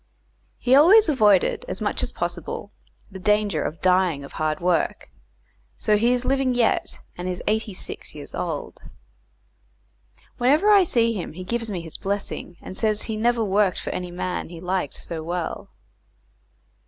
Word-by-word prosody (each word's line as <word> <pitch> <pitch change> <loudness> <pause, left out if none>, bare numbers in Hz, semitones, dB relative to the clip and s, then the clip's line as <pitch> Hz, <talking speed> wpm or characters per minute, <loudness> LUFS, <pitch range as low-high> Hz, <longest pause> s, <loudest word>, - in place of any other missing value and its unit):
He 250 - +1
always 355 +9 +7
avoided, 210 - +3
as - - -4
much - - 0
as - - -2
possible, - - -4 0.4
the 190 - -8
danger 210 -4 +1
of 160 - -5
dying 180 -5 +3
of 140 - -10
hard 155 -1 -1
work, 175 -1 0 0.7
so 210 - +2
he 230 +4 +3
is 250 0 0
living 265 -2 +1
yet, 235 -2 +1 0.2
and 180 +1 -4
is 180 - -4
eighty 215 0 0
six - - -6
years - - -9
old. - - -4 1.6
Whenever 300 +12 +4
I 405 -1 +7
see 230 -6 +2
him 185 -7 -5
he 185 +3 -7
gives 230 +4 -3
me 185 -4 -3
his 165 -2 -8
blessing, 195 -3 -4
and 185 - -8
says 215 0 +1
he 220 - -4
never 235 +1 +1
worked 200 -2 +2
for - - -4
any 180 -1 -4
man 180 0 -4
he 170 -1 -9
liked 180 -4 -2
so 165 -2 -5
well. 170 +1 -4
205 Hz, 165 wpm, -24 LUFS, 180-235 Hz, 1.6 s, always